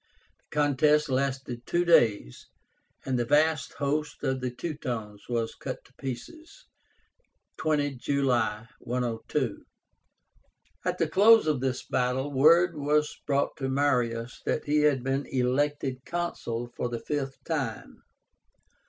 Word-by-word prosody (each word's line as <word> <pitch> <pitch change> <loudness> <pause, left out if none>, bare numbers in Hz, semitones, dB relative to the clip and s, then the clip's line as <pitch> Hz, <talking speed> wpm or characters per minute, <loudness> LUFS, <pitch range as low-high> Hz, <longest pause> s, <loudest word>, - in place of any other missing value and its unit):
The - - -11
contest 150 +1 +3
lasted 130 -2 -2
two 175 +1 +1
days, 110 - +3 0.6
and 130 -2 0
the - - +2
vast 150 +2 +2
host 150 +1 -2
of 130 -1 -1
the 125 - -1
Teutones 120 -8 -5
was 115 -2 -1
cut - - -7
to - - -22
pieces 315 - -8 0.9
(20 145 -3 0
July, 120 -6 0
102). 120 -2 -2 1.2
At - - -1
the - - +1
close 220 +3 +6
of 150 -4 +1
this 130 -1 -1
battle 130 +2 0
word 165 +5 +5
was 150 +1 +1
brought 140 -1 +1
to 135 -1 -2
Marius 125 -4 0
that - - -1
he 150 +1 +2
had 145 -4 +3
been 135 +1 -1
elected 130 +1 0
Consul 120 -9 -3
for 125 - -2
the 120 -1 -4
fifth 135 0 -3
time. 140 -9 -4
135 Hz, 125 wpm, -28 LUFS, 125-150 Hz, 1.2 s, close